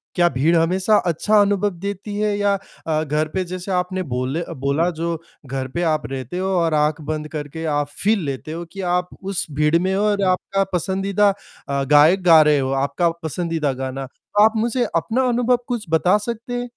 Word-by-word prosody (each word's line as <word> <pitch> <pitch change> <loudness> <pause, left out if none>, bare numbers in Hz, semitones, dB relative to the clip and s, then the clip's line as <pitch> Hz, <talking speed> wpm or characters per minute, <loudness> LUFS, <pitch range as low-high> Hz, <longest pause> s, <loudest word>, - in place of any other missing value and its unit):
क्या 175 -1 +4
भीड़ 145 +6 +2
हमेशा 185 +6 +2
अच्छा 210 +6 +2
अनुभव 205 0 +2
देती 200 +1 -4
है 210 -1 +1
या 205 -1 +2 0.3
अ, 155 0 +1
घर 150 +1 0
पे 190 -1 0
जैसे 185 +2 -6
आपने 185 +1 -1
बोले 130 +3 -2
अ, - - -6
बोला 140 +6 0
जो 165 0 -3 0.3
घर 130 0 -4
पे 170 +7 -3
आप 155 -2 0
रहते 130 +5 -5
हो 190 +1 -1
और 165 -2 +1
आँख 150 +1 +1
बंद 155 -1 -3
करके 155 +1 -6
आप 145 0 0 0.2
फ़ील 215 +1 +3
लेते 140 +2 -5
हो 170 +1 -5
कि 195 - -6
आप 180 0 0
उस 195 -1 -2
भीड़ 150 +3 +2
में 190 +1 0
हो 205 - +1
और 200 -1 0
आपका 195 +2 0
पसंदीदा 195 +3 +1 0.4
अ, 140 0 0
गायक 150 +7 +5
गा 165 -3 +8
रहे 150 -2 +4
हो, 135 0 -1
आपका 140 +6 +1
पसंदीदा 160 -3 -1
गाना। 130 +1 -5 0.3
आप 220 +1 +6
मुझे 240 +3 +1
अपना 230 +10 +1
अनुभव 245 +1 +2
कुछ 240 -5 -3
बता 175 +5 +3
सकते 230 +3 -5
हैं? 245 0 -3
170 Hz, 195 wpm, -21 LUFS, 150-200 Hz, 0.4 s, गा